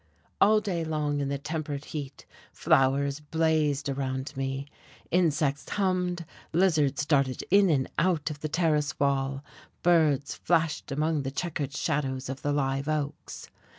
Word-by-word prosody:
All 215 +1 +6
day 180 -6 -2
long 150 -2 -1
in 140 -1 -1
the 140 - -1
tempered 150 0 -4
heat 140 -3 -7 0.3
flowers 140 +2 +2
blazed 150 -2 +1
around 135 -1 -3
me, 135 +1 -3 0.5
insects 150 -5 +1
hummed, 180 -3 0 0.3
lizards 155 -5 +2
darted 135 -4 +1
in 200 -1 +6
and 135 -5 +2
out 165 -4 +1
of 145 - -8
the 155 - -4
terrace 155 -2 +1
wall, 135 0 0 0.4
birds 155 -5 +3
flashed 165 -4 0
among 155 +2 0
the 135 - -3
checkered 145 -1 -3
shadows 135 -4 -1
of 135 0 -5
the 145 - 0
live 135 -1 0
oaks. 150 -2 -4
145 Hz, 140 wpm, -28 LUFS, 140-160 Hz, 0.5 s, All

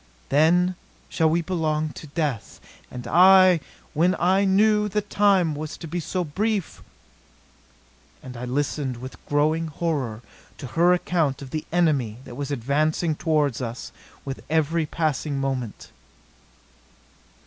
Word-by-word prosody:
Then 175 +5 +3 0.4
shall 160 -2 +2
we 170 +2 +1
belong 155 -3 -1
to 155 - -10
death! 145 -6 -3 0.3
And 125 -1 -8
I 185 +4 +6 0.3
when 175 +4 +2
I 190 +3 +3
knew 210 +2 +3
the 210 +1 -1
time 195 -5 +2
was 150 +1 -6
to 165 - -8
be 175 +3 -3
so 180 +2 -2
brief 200 +4 -2 0.7
" - - -32
And 130 -1 -9
I 120 +1 -6
listened 135 0 -2
with 130 +2 -10
growing 155 +3 +1
horror 140 -8 -3 0.3
to 145 - -8
her 170 +7 +3
account 165 -6 0
of 130 - -11
the 155 - -4
enemy 145 -11 +1
that - - -10
was 140 +2 -5
advancing 150 +5 0
toward 150 -4 0
us 120 -1 -6 0.3
with 135 -1 -6
every 160 0 +1
passing 150 -2 -1
moment. 130 -5 -4
155 Hz, 135 wpm, -24 LUFS, 140-175 Hz, 0.7 s, I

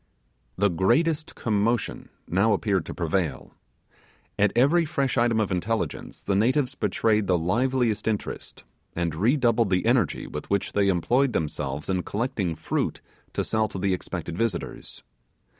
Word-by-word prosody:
The 100 0 +3
greatest 155 - +1
commotion 115 +2 -1 0.2
now 100 +5 +3
appeared 100 -4 0
to - - -5
prevail. 85 -4 -2 0.9
At 100 -1 +4
every 145 +8 +4
fresh 140 -4 -1
item 120 -2 +2
of 105 -3 0
intelligence 105 +5 -2
the 100 - 0
natives 125 +6 +2
betrayed 110 -5 +1
the 90 - +3
liveliest 115 +5 0
interest, 110 -2 -4 0.3
and 85 -2 -1
redoubled 115 - +2
the 90 -1 +1
energy - - +2
with 75 - -7
which 100 -1 0
they 100 -1 +2
employed 120 +9 +2
themselves 75 -2 -3
in 95 -1 0
collecting 100 -5 -2
fruit - - -2 0.3
to - - 0
sell 110 -1 +1
to 100 - -7
the 95 0 +1
expected 85 -2 -4
visitors. 100 -3 -3
105 Hz, 140 wpm, -25 LUFS, 90-120 Hz, 0.9 s, At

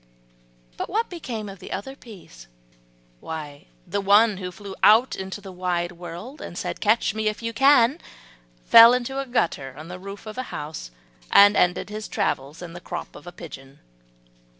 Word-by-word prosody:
But - - -4
what 445 +2 -1
became 240 -11 -5
of 195 -1 -10
the 185 - -10
other 235 +8 -5
peas? 180 - -14 0.7
Why 150 - -8 0.2
the 200 - -2
one 205 +1 +4
who 180 -1 -5
flew 200 +1 -9
out 225 +5 +5
into 190 +2 -6
the 195 -1 -10
wide 180 -1 -2
world, 175 - -9
and 175 - -8
said, - - -4
"Catch 215 -1 +2
me 215 0 -2
if 215 +2 -3
you 230 0 -3
can," 270 +2 +4 0.7
fell 230 +1 +9
into 250 +2 -3
a 275 - -4
gutter 140 - -1
on 155 +3 -10
the 180 0 -7
roof 195 +2 -9
of 215 +3 -7
a - - -2
house, 150 - -6 0.4
and 205 +1 +7
ended 180 +3 +1
his 215 0 -5
travels 140 +6 -2
in 170 -1 -9
the 175 - -9
crop - - -7
of - - -13
a - - -7
pigeon. 135 -6 -11
200 Hz, 180 wpm, -24 LUFS, 175-230 Hz, 0.7 s, fell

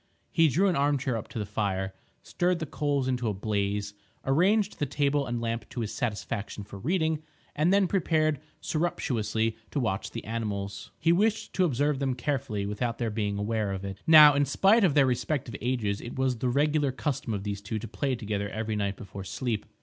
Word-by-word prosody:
He 165 -2 +5
drew 180 +8 +3
an 180 - +2
arm 145 +1 +2
chair 130 -2 -1
up 110 - -4
to - - -8
the 105 - -2
fire, 95 -2 -2 0.3
stirred 180 0 0
the 165 - -3
coals 145 -2 -1
into 125 -3 0
a 105 - -2
blaze, 100 0 -1 0.3
arranged 190 +9 +2
the 145 - 0
table 140 0 +1
and 120 -1 -2
lamp 115 0 -3
to 120 - -4
his 110 - -3
satisfaction 105 -3 -3
for 100 0 -10
reading, 160 - 0 0.3
and 155 +4 +3
then 200 0 +5
prepared 155 -6 +1 0.2
surreptitiously 115 -9 -1
to 145 - -2
watch 110 -6 -1
the - - -7
animals. 100 -3 -4
He 165 - +2
wished 215 +5 +1
to 185 - +3
observe 145 -1 +1
them 135 -2 0
carefully 125 -5 -2
without 115 +4 -2
their 115 -2 -1
being 105 -2 -1
aware 105 0 -1
of 95 0 -4
it. 95 0 -6
Now, 155 -2 +10
in 145 0 +3
spite 195 - +4
of 165 -7 +3
their 145 -2 +6
respective 125 -1 -1
ages, 110 -4 -1
it 120 - -7
was 130 -3 0
the 125 - 0
regular 145 +1 +2
custom 135 -3 -2
of 100 - -4
these 100 -1 -4
two 105 +2 -4
to 110 +2 -5
play 135 +1 -1
together 105 -3 -3
every 110 0 -3
night 100 -1 -1
before 100 -2 -8
sleep. 110 +2 -3
125 Hz, 205 wpm, -28 LUFS, 105-150 Hz, 0.3 s, Now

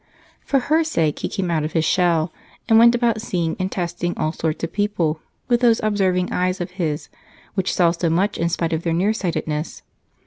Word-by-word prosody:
For 275 -2 +1
her 315 +6 +2
sake 165 - 0
he - - -3
came 185 -3 -2
out 160 -2 +1
of 155 - -4
his 160 -1 +1
shell 170 -2 +2 0.3
and 225 0 +6
went 235 +1 +7
about 235 -2 +1
seeing 175 -7 -1
and 185 0 -2
testing 175 -1 -3
all 155 - 0
sorts 160 -1 -3
of 165 - -3
people 180 -7 0 0.3
with 240 -1 +3
those 230 -2 +4
observing 190 -4 +1
eyes 185 +1 0
of 175 +1 -4
his, 165 -5 -3 0.5
which 190 -2 0
saw 170 -2 +4
so 170 0 -1
much 185 +5 0
in 170 +1 +1
spite 165 -1 -1
of 160 - -1
their 170 -1 -1
nearsightedness. 170 -5 -1
180 Hz, 200 wpm, -21 LUFS, 165-205 Hz, 0.5 s, went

